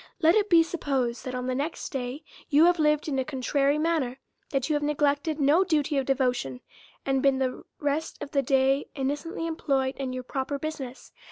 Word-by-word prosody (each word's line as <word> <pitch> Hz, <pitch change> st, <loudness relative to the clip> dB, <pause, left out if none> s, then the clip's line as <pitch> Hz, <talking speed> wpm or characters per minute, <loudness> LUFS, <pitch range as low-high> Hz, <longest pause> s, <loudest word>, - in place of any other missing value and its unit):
Let 325 Hz, -1 st, +5 dB
it 420 Hz, 0 st, +2 dB
be 335 Hz, -2 st, +7 dB
supposed, 270 Hz, -8 st, -2 dB
that, 255 Hz, -1 st, -4 dB
on 250 Hz, 0 st, -3 dB
the 255 Hz, -, -1 dB
next 285 Hz, +5 st, -3 dB
day, 265 Hz, +2 st, -4 dB, 0.3 s
you 300 Hz, +2 st, +6 dB
have 350 Hz, -1 st, +4 dB
lived 300 Hz, 0 st, +2 dB
in 275 Hz, -3 st, 0 dB
a -, -, +1 dB
contrary 280 Hz, +1 st, +1 dB
manner; 305 Hz, -6 st, 0 dB, 0.3 s
that 270 Hz, -2 st, -1 dB
you 310 Hz, -, 0 dB
have 295 Hz, -, +1 dB
neglected 295 Hz, +1 st, 0 dB
no 295 Hz, +6 st, +4 dB
duty 305 Hz, -5 st, 0 dB
of 265 Hz, -, -3 dB
devotion, 250 Hz, -, 0 dB, 0.4 s
and 270 Hz, -1 st, +1 dB
been 275 Hz, -1 st, +3 dB
the 260 Hz, -1 st, -2 dB, 0.2 s
rest 290 Hz, +2 st, -1 dB
of 285 Hz, -, -7 dB
the 280 Hz, -3 st, +2 dB
day 270 Hz, +1 st, +2 dB
innocently 290 Hz, +4 st, -3 dB
employed 275 Hz, -5 st, 0 dB
in 265 Hz, -2 st, -3 dB
your 255 Hz, 0 st, -4 dB
proper 270 Hz, +2 st, -3 dB
business. 275 Hz, -4 st, -6 dB
280 Hz, 195 wpm, -27 LUFS, 265-310 Hz, 0.4 s, be